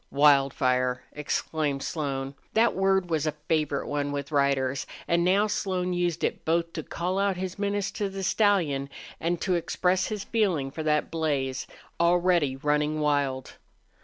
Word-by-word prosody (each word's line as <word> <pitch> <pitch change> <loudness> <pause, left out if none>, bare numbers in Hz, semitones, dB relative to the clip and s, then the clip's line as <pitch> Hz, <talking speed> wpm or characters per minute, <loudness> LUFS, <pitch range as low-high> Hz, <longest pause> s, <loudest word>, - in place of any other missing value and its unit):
"Wildfire!" 130 -3 +3
exclaimed 150 -1 -2
Slone. 135 -4 -3 0.2
That 230 +1 +4
word 190 -2 +1
was 155 -1 +1
a 155 - 0
favorite 150 -3 0
one 145 -1 -2
with 140 0 -4
riders, 140 -2 +1 0.2
and 170 0 +2
now 195 +4 +4
Slone 185 -3 -1
used 175 -2 -1
it - - -1
both 165 +1 0
to 160 - -3
call 180 +5 -2
out 200 -2 +1
his 185 +1 -5
menace 200 -1 -1
to 205 -2 -2
the 195 0 -5
stallion 175 -10 +2 0.3
and 170 +1 -1
to 185 - +1
express 180 +2 +1
his 210 -2 -4
feeling 180 -12 0
for 160 - -5
that 150 -1 +1
blaze, 140 -5 -1 0.3
already 170 -4 +3
running 150 +2 0
wild. 140 -3 0
160 Hz, 155 wpm, -27 LUFS, 140-185 Hz, 0.3 s, That